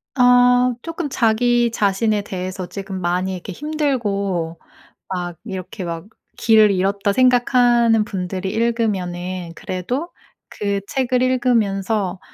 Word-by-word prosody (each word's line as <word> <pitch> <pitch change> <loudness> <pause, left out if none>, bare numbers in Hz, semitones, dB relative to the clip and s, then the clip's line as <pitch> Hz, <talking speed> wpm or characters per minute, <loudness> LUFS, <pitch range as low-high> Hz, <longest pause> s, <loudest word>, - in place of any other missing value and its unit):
아. 250 -1 +5
쪼끔 330 -2 -4
자기 240 0 +2
자신에 210 0 +1
대해서 185 -1 -5
지금 195 0 -6
많이 180 +2 -1
이렇게 185 +2 -7
힘들고 200 - -2 0.5
막 175 -3 -4
이렇게 190 -3 -6
막 170 0 -5 0.3
'길을 215 -2 +5
잃었다.' 200 +2 0
생각하는 245 -2 +4
분들이 190 -2 -4
읽으면은 185 -6 -2
그래도 245 - -4 0.4
그 200 -1 -2
책을 255 -1 0
읽으면서 215 -6 +1
205 Hz, 255 characters per minute, -20 LUFS, 185-245 Hz, 0.5 s, 아